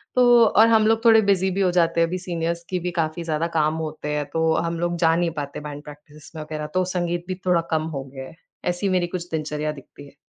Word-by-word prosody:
तो 245 -2 +6
और 220 +1 +5
हम 220 -1 +4
लोग 225 0 +2
थोड़े 225 -1 +7
बिज़ी 190 0 +1
भी 195 +2 -1
हो 185 -2 +3
जाते 170 -1 +2
हैं। 165 - +3
अभी 180 +2 -3
सीनियर्स 170 -1 -3
की 185 - -1
भी 180 +1 -3
काफ़ी 160 +1 -1
ज़्यादा 160 0 -1
काम 155 0 +2
होते 155 -2 -5
हैं 150 0 -1
तो 160 0 +2
हम 170 0 -2
लोग 175 0 -1
जा 165 -1 +3
नहीं 170 -1 0
पाते 140 0 -6
बैंड 145 -1 -8
प्रैक्टिसेस 150 +1 -14
वग़ैरह 155 -1 -5
तो 185 0 +2
संगीत 175 -1 -2
भी 185 - -3
थोड़ा 180 -2 +3
कम 160 -1 +1
हो 135 - -4
गया 135 -1 -7
है। - - -14 0.4
ऐसी 195 +3 -2
मेरी 180 -2 +1
कुछ 175 0 -6
दिनचर्या 150 -1 -2
दिखती 145 0 -13
है। - - -19
170 Hz, 245 wpm, -23 LUFS, 155-180 Hz, 0.4 s, थोड़े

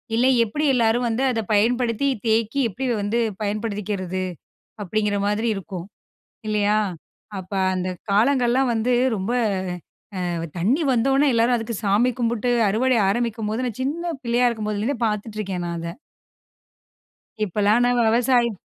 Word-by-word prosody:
இல்ல 250 +3 +3 0.2
எப்டி 295 +8 -2
எல்லாரும் 240 0 +2
வந்து 235 +4 -1
அதை 225 -2 -1
பயன்படுத்தி, 240 +4 +2 0.2
தேக்கி 225 +4 +1
எப்டி 260 +7 -5 0.2
வந்து 215 +4 0 0.2
பயன்படுத்திக்கிறது?" 205 -3 -3 0.6
அப்டிங்கிற 210 +1 0
மாதிரி 215 +3 0
இருக்கும், 180 -1 -6 0.6
இல்லையா? 210 0 +2 0.6
அப்ப 185 +1 -8 0.2
அந்த 185 0 -2 0.2
காலங்கள்லாம் 245 +4 +3
வந்து 230 +3 0 0.2
ரொம்ப 200 +3 -2 1.1
அ - - -4
தண்ணி 235 - +2
வந்தவுடனே 270 +4 +3
எல்லாரும் 235 +2 +3
அதுக்கு 225 0 -4
சாமி 210 +6 +3
கும்பிட்டு 235 0 0 0.2
அறுவடை 245 +5 +2
ஆரம்பிக்கும்போது, 225 +1 -1
நான் 240 +1 -5
சின்ன 335 +5 -2
பிள்ளையா 240 +1 +2
இருக்கும்போதுலருந்தே 215 +2 -2
பார்த்துட்ருக்கேன் 210 -4 -3
நான் 170 0 -3
அத. 170 0 -5 1.5
இப்போலாம் 210 +4 +2
நான் 245 0 +2
விவசாயம் 235 -2 +2
225 Hz, 120 wpm, -23 LUFS, 205-245 Hz, 1.5 s, இல்ல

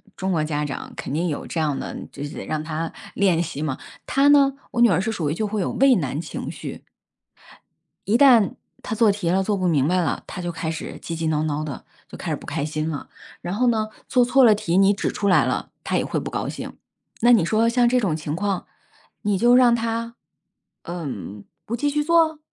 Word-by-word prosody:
中 190 0 -2
国 160 -3 +1
家 150 -1 -2
长 145 - -5
肯 - - -6
定 170 +4 0
有 150 - -4
这 165 - -3
样 150 -3 0
的， - - -5
就 140 - -7
是 145 - -6
让 155 0 -2
她 160 +1 -4 0.2
练 180 -4 +3
习 155 -3 -4
嘛。 135 -4 -1 0.3
她 280 +1 +3
呢， 280 -2 +6 0.2
我 240 - -4
女 240 -2 +6
儿 180 - +2
是 225 +2 -1
属 165 -8 -2
于 - - 0
就 215 +5 -2
会 210 0 -2
有 - - -1
畏 270 -2 +4
难 145 -3 -2
情 - - -6
绪。 - - -8 1.2
一 225 +3 +4
旦 245 -7 +6 0.3
她 220 - -4
做 220 -2 +4
题 195 -4 -2
了， 190 +2 +2
做 205 +1 0
不 185 -1 0
明 145 -4 +2
白 180 +1 +2
了， - - -2
她 180 - -6
就 175 0 -3
开 165 -1 -4
始 165 - -6
急 165 - -5
急 160 0 -2
闹 155 -1 +1
闹 150 0 -1
的， 145 -3 -6 0.2
就 - - -10
开 - - -4
始 - - +1
不 - - -13
开 140 - -2
心 155 +1 -2
了。 145 - -6 0.3
然 175 - -4
后 250 +4 +1
呢， 215 -2 +1 0.2
做 250 -1 +4
错 265 +2 +4
了 215 -3 +7
题 180 -3 -1
你 195 +1 +5
指 - - -2
出 200 - -2
来 185 - +5
了， - - -2
她 - - 0
也 - - 0
会 - - -2
不 - - -6
高 - - -2
兴， - - -7 0.4
那 240 +1 +6
你 215 -8 +6
说 220 +4 +2
像 240 0 +3
这 250 0 +3
种 185 -9 0
情 150 -1 -4
况， 195 0 -2 0.6
你 205 -2 +1
就 240 +4 +5
让 245 -2 +6
她， 230 +1 -3 0.7
呃， 170 -3 -5 0.6
不 235 - -3
继 290 +4 0
续 295 +1 0
做？ 320 -1 +3
190 Hz, 250 characters per minute, -23 LUFS, 160-235 Hz, 1.2 s, 了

